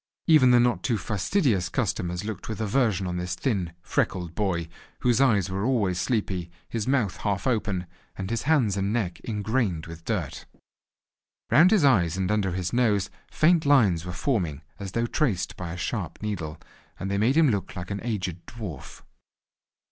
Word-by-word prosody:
Even 155 -6 +6
the 125 -1 +6
not 120 0 +2
too 120 -4 0
fastidious 105 - 0
customers 90 +2 -2
looked 105 -2 -6
with 110 - -4
aversion 110 -3 +1
on 90 -1 -3
this 90 0 -3
thin, 95 -10 -1
freckled 85 +2 -1
boy, 85 -4 -1 0.3
whose 125 +1 +3
eyes 105 -9 +3
were 95 +1 -2
always 105 -8 +1
sleepy, 95 -8 -1 0.2
his 115 0 -3
mouth 130 -8 +1
half 100 -2 -2
open, 105 -7 0 0.3
and 95 +2 -5
his 115 - 0
hands 125 -11 +3
and 100 0 -1
neck 105 -7 -1
ingrained 105 -6 -1
with 85 0 -10
dirt. - - -3 1.0
Round 160 +10 +7
his 200 -8 +4
eyes 90 - +3
and 95 +1 0
under 100 -4 +1
his 90 0 -3
nose 110 -6 +2 0.2
faint 165 +1 +3
lines 110 - +4
were 90 - -5
forming 90 - -1 0.2
as 100 -1 -6
though 115 0 +1
traced 120 - 0
by 85 -2 -6
a 90 - -6
sharp - - -3
needle, 85 -7 -4 0.4
and 95 +1 -3
they 100 - 0
made 125 +8 +3
him 155 -5 +5
look 100 -4 -3
like 90 0 -6
an 100 - -3
aged 95 -7 -3
dwarf. 105 - -8
100 Hz, 175 wpm, -26 LUFS, 90-120 Hz, 1.0 s, Round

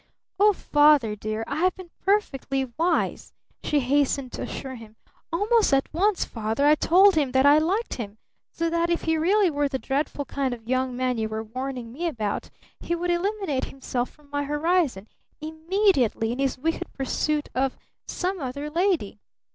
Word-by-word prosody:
"Oh, 420 +1 +6
Father 295 - +3
dear 215 +1 -4
I 285 - -4
have 365 +3 +2
been 370 -3 -11
perfectly 275 -9 0
wise!" 340 +3 0 0.3
she 295 -1 +1
hastened 275 0 +1
to - - -6
assure 265 -1 -5
him. 225 -3 -12 0.4
"Almost 420 +5 +2
at 270 - -1
once, 390 +4 +2
Father, 225 +4 -1
I 295 - +7
told 375 +6 +5
him 290 -6 +1
that 265 +1 +4
I 290 +2 +7
liked 385 +9 -1
him, 210 -3 -6 0.3
so 335 - -1
that 335 0 +1
if 340 - 0
he 320 0 +1
really 370 +4 +3
were 290 -1 +1
the 270 -1 -2
dreadful 280 +3 -2
kind 270 -3 -2
of 225 -1 -18
young 255 0 0
man 255 -2 0
you 220 0 -1
were 220 0 -3
warning 250 +1 -5
me 340 +6 -2
about, 220 -10 -3 0.3
he 345 - -2
would 350 +1 -1
eliminate 370 -5 -1
himself 255 -2 -3
from 300 -1 -23
my 285 0 -1
horizon 295 - 0 0.3
immediately 315 - +1
in 245 - -4
his 275 -2 0
wicked 325 +5 -2
pursuit 295 +2 -1
of 265 0 0 0.3
some 370 +1 -2
other 285 +2 -5
lady! 335 - 0
290 Hz, 175 wpm, -25 LUFS, 255-340 Hz, 0.4 s, I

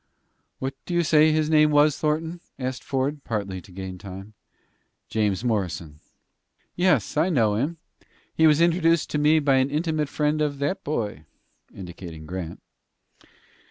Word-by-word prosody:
"What 135 +1 -3
do 175 - -2
you 175 - +3
say 155 0 +5
his 155 0 +1
name 155 -1 +5
was, 145 0 +4
Thornton?" 160 +3 -1 0.2
asked 130 -1 -4
Ford, 140 +2 -2
partly 100 -5 -3
to 95 - -17
gain 95 0 -7
time. 95 +2 -9 0.8
"James 105 -1 0
Morrison." 90 -9 -2 0.8
"Yes; 175 - +2
I 165 +4 +3
know 115 - +2
him. 140 +11 -1 0.6
He 160 - +4
was 155 +1 +4
introduced 165 -1 +3
to 150 - 0
me 150 +2 +4
by 140 -3 +3
an 130 +1 +2
intimate 155 0 -1
friend 150 +1 0
of 145 -2 0
that 145 +8 -2
boy," 105 - -3 0.5
indicating 85 -3 -9
Grant. 85 0 -6
140 Hz, 150 wpm, -24 LUFS, 100-155 Hz, 0.8 s, say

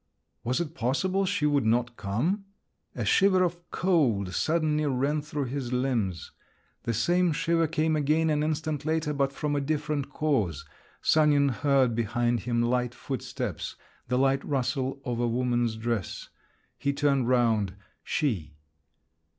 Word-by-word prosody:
Was 125 +5 0
it 165 -2 -3
possible 185 +9 0
she 190 -6 0
would 145 -2 +3
not 120 +2 +1
come? 145 - -1 0.5
A - - -2
shiver 190 -2 +4
of 175 0 -3
cold 125 - +1
suddenly 155 -2 +1
ran 140 +3 0
through 145 -1 -3
his 130 -1 -4
limbs. 120 -9 -1 0.5
The 115 - 0
same 175 - +2
shiver 165 +1 +1
came 155 0 +1
again 155 +2 +2
an 150 -1 +1
instant 155 -1 -1
later, 155 0 0
but 140 -1 +1
from 145 +1 -2
a 145 - +1
different 145 -1 -2
cause. 105 - 0 0.4
Sanin 145 -2 +4
heard 135 -1 +2
behind 120 +1 0
him 120 +1 0
light 125 0 0
footsteps, 135 -3 -4 0.3
the 125 - 0
light 135 +1 +2
rustle 135 0 -1
of 120 -2 -2
a 120 - +1
woman's 120 -1 0
dress…. 110 -4 -3 0.5
He 140 - 0
turned 140 -3 +1
round: 110 -6 +2 0.3
she! 95 - -1
140 Hz, 140 wpm, -27 LUFS, 120-155 Hz, 0.5 s, shiver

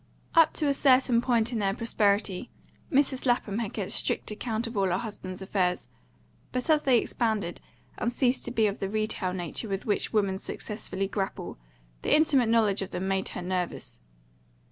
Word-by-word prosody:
Up 330 -1 +6
to 300 - 0
a 280 - +3
certain 255 -3 +4
point 240 -1 +1
in 230 - 0
their 195 -1 +1
prosperity 205 -2 +1 0.4
Mrs. 270 -1 +2
Lapham 225 -3 +1
had 225 -4 -2
kept 200 -4 -3
strict - - -1
account 220 +1 -2
of 230 0 -6
all 195 -1 +2
her 180 0 +1
husband's 195 -3 -6
affairs; 180 -2 0 0.6
but 255 +3 -2
as 305 -1 +4
they 260 -4 +4
expanded, 220 -7 -1 0.4
and 235 - 0
ceased 250 +1 +1
to 240 - -4
be 225 -2 +2
of 200 -1 -1
the 195 - -2
retail 215 -3 -1
nature 180 +4 -4
with 195 0 -3
which 210 - 0
women 200 -3 +1
successfully 195 -3 -4
grapple, 195 - -4 0.4
the - - +3
intimate 280 -7 +4
knowledge 220 -4 +3
of 195 - -4
them 180 +2 -3
made 195 0 0
her 180 - -5
nervous. 180 - -3
215 Hz, 180 wpm, -28 LUFS, 195-245 Hz, 0.6 s, Up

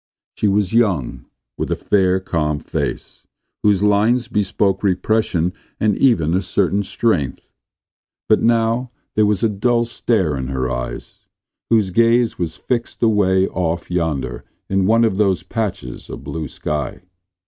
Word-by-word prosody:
She 105 - 0
was 100 0 +1
young, 100 - +1 0.3
with - - -2
a - - +1
fair, 95 -2 +2
calm 80 -5 -1
face, - - -5 0.3
whose 105 -2 +3
lines 110 +4 +3
bespoke 100 -1 0
repression 95 -3 +1 0.3
and 105 -2 +2
even 85 - +3
a 95 - +2
certain 100 +2 0
strength. 90 - -1 0.8
But 110 - +4
now 115 +2 +2 0.2
there 105 -1 +3
was 105 -1 0
a - - +5
dull 120 +3 +1
stare 105 -9 0
in 65 -1 -4
her 65 -1 -2
eyes, - - -6 0.4
whose 110 -5 +3
gaze 115 +2 +3
was 80 -3 -3
fixed 120 -1 -3
away 95 -4 +3
off 85 -1 -2
yonder 70 -8 -2 0.3
on 95 -1 +2
one 115 +2 +4
of 110 -4 +1
those 95 -5 +2
patches 95 - -4
of - - -8
blue 80 -2 -4
sky. 75 +4 -4
95 Hz, 145 wpm, -19 LUFS, 85-110 Hz, 0.8 s, a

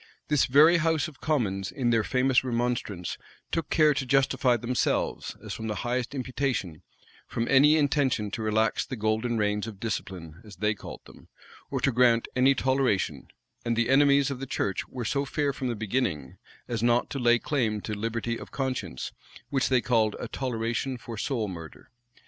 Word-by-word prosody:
This 150 -3 +3
very 155 +6 +6
house 160 -1 +1
of 145 -4 -14
commons, 100 -11 -1
in 125 -4 0
their 115 -2 +3
famous 130 +1 +2
remonstrance, 120 -7 -2 0.3
took 165 -3 -2
care 155 -2 +4
to 140 - -2
justify 130 -1 +2
themselves, 120 +2 -1
as - - -5
from 110 - -5
the 105 - -2
highest 125 +2 -2
imputation, 125 - -2 0.5
from 115 - -2
any 145 +3 +6
intention 140 -8 +1
to 110 - -4
relax 110 0 +1
the 130 - -6
golden 110 +2 0
reins 105 0 0
of 105 -4 -8
discipline, 90 -7 -5
as 105 -3 -12
they 105 0 +1
called 100 - -10
them, - - -16 0.4
or - - -2
to 135 - +2
grant 120 -1 +3
any 130 +2 +4
toleration;[*] 130 -6 0 0.4
and 115 0 0
the 120 +2 +1
enemies 140 0 +4
of 130 - -5
the 135 - -5
church 95 -6 -2
were 125 -2 -6
so 140 +5 0
fair 140 0 -1
from 135 -2 -4
the 120 - -1
beginning, 105 - -2 0.3
as 115 -3 -2
not 120 +1 +2
to 140 - -3
lay 120 -1 +4
claim 115 -5 -1
to 110 - -5
liberty 115 +2 -2
of - - -10
conscience, 125 - -3 0.4
which 135 -1 +1
they 130 -2 +3
called 110 -4 +2
a - - -4
toleration 120 0 -2
for 115 -1 -8
soul 110 0 -2
murder. 85 +4 -10
120 Hz, 180 wpm, -27 LUFS, 110-135 Hz, 0.5 s, very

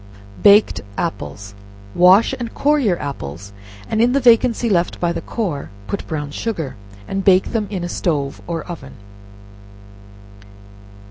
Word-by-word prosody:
Baked 205 +1 +5 0.2
Apples. 105 - -4 0.4
Wash 185 +5 +5
and 235 -2 -6
core 295 +1 +2
your 200 -10 +1
apples, 100 - -7 0.3
and 220 - 0
in 245 +2 +3
the 275 - +3
vacancy 240 -1 +4
left 180 -5 0
by 170 -1 0
the - - -4
core, 180 -12 -4 0.2
put 200 - -5
brown 145 -3 -4
sugar, 165 - -4 0.3
and 195 0 -2
bake 190 -1 +4
them 220 -3 -1
in 190 -4 -4
a - - -2
stove 145 -6 -2
or 165 -2 -3
oven. 175 -3 -9
180 Hz, 140 wpm, -19 LUFS, 155-225 Hz, 0.4 s, Baked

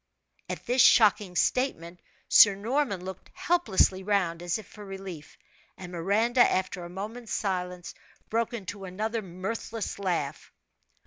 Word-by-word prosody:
At - - -5
this 250 +1 +3
shocking 205 -6 +5
statement 175 -7 0 0.3
Sir 205 -2 +7
Norman 215 -3 -1
looked 190 0 -8
helplessly 205 - +2
round, 185 -4 0
as 175 +2 -1
if 220 - -10
for 210 - -13
relief; 190 -6 -9 0.4
and 180 -2 -9
Miranda, 205 +8 0
after 185 -4 +1
a 175 - -8
moment's 215 +6 -7
silence, 180 -3 -3 0.3
broke 230 +1 -1
into 200 -3 -6
another 215 +5 -3
mirthless 200 +4 -5
laugh. 170 -7 -3
195 Hz, 130 wpm, -28 LUFS, 180-225 Hz, 0.4 s, Sir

